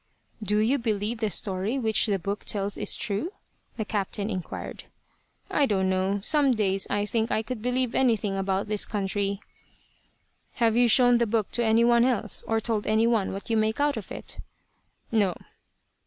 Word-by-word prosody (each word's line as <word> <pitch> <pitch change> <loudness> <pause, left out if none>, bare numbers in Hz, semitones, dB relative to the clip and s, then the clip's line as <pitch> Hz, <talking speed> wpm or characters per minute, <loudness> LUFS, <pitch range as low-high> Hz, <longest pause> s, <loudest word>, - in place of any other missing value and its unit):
"Do 210 0 0
you 235 +7 +2
believe 220 0 -2
the 220 -2 0
story 195 +5 -1
which 220 -3 +2
the 200 -2 +1
book 200 +3 -4
tells 200 -1 -1
is - - +1
true?" 225 - -3 0.4
the 220 - -2
captain 205 0 -2
inquired. 185 -3 -6 0.7
"I 285 - +3
don't 190 -3 +1
know. 190 +2 0
Some 280 +4 +3
days 195 -2 0
I 205 0 0
think 225 +1 -1
I 220 - 0
could 240 -1 -6
believe 250 +1 0
anything 220 -6 +1
about 195 0 -1
this 210 -1 0
country." 200 -1 -2 1.1
"Have 230 -2 +2
you 245 0 +5
shown 245 0 +5
the 235 - +2
book 215 -1 -1
to 240 - 0
any 225 +1 +4
one 235 0 +4
else, 240 -4 0
or 225 0 +1
told 220 -2 -2
any 220 +1 +3
one 225 -4 +1
what 200 +4 -6
you 225 - +2
make 220 +2 0
out 290 0 +2
of 220 -5 -7
it?" - - -7 0.7
"No." 205 -6 +2
215 Hz, 180 wpm, -26 LUFS, 200-235 Hz, 1.1 s, you